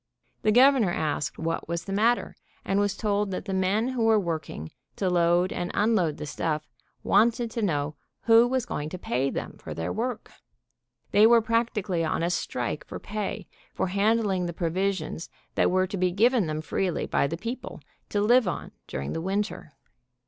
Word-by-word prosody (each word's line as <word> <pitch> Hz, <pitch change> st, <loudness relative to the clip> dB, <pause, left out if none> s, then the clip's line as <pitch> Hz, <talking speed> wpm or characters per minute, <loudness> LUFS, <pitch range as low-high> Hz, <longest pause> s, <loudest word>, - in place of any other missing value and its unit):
The 215 Hz, -, +3 dB
Governor 255 Hz, -3 st, +5 dB
asked 145 Hz, -5 st, -2 dB
what 165 Hz, 0 st, -3 dB
was 170 Hz, 0 st, -2 dB
the 195 Hz, -, -5 dB
matter, 230 Hz, +4 st, +1 dB, 0.3 s
and 195 Hz, +1 st, +1 dB
was 205 Hz, -1 st, 0 dB
told 205 Hz, -2 st, 0 dB
that 190 Hz, -, -4 dB
the 195 Hz, -, -3 dB
men 195 Hz, +6 st, +1 dB
who 245 Hz, -3 st, 0 dB
were 220 Hz, -1 st, +5 dB
work 165 Hz, -5 st, -3 dB
ing 80 Hz, +1 st, -7 dB, 0.2 s
to 190 Hz, -2 st, 0 dB
load 175 Hz, +1 st, +3 dB
and 175 Hz, -, -3 dB
unload 205 Hz, -8 st, +2 dB
the -, -, -5 dB
stuff 155 Hz, +1 st, -2 dB, 0.4 s
wanted 230 Hz, +1 st, +3 dB
to 230 Hz, -, -3 dB
know 150 Hz, -7 st, 0 dB, 0.3 s
who 230 Hz, +1 st, +6 dB
was 255 Hz, -1 st, 0 dB
going 150 Hz, +1 st, -4 dB
to 185 Hz, -, -6 dB
pay 135 Hz, -5 st, -1 dB
them -, -, -5 dB
for -, -, -7 dB
their 80 Hz, +1 st, -3 dB
work! 230 Hz, 0 st, -3 dB, 0.8 s
They 210 Hz, +2 st, +7 dB
were 235 Hz, 0 st, +7 dB
practically 220 Hz, -6 st, 0 dB
on 160 Hz, +1 st, -1 dB
a 170 Hz, -, +1 dB
strike -, -, -2 dB
for -, -, -6 dB
pay 210 Hz, -1 st, -4 dB, 0.3 s
for 190 Hz, -, -1 dB
handling 200 Hz, -2 st, +1 dB
the 170 Hz, -, -4 dB
provisions 175 Hz, 0 st, -2 dB, 0.2 s
that -, -, +3 dB
were 185 Hz, +1 st, +2 dB
to 195 Hz, +1 st, -5 dB
be 185 Hz, 0 st, +2 dB
given 220 Hz, +2 st, +3 dB
them 155 Hz, 0 st, -3 dB
freely 175 Hz, +2 st, -1 dB
by -, -, +1 dB
the 165 Hz, -, -4 dB
people, 235 Hz, +7 st, -6 dB, 0.3 s
to 205 Hz, -, 0 dB
live 240 Hz, +1 st, +4 dB
on 180 Hz, -, -4 dB, 0.2 s
during 70 Hz, +1 st, -4 dB
the 165 Hz, -, -3 dB
winter. 195 Hz, -4 st, -3 dB
195 Hz, 185 wpm, -26 LUFS, 170-220 Hz, 0.8 s, They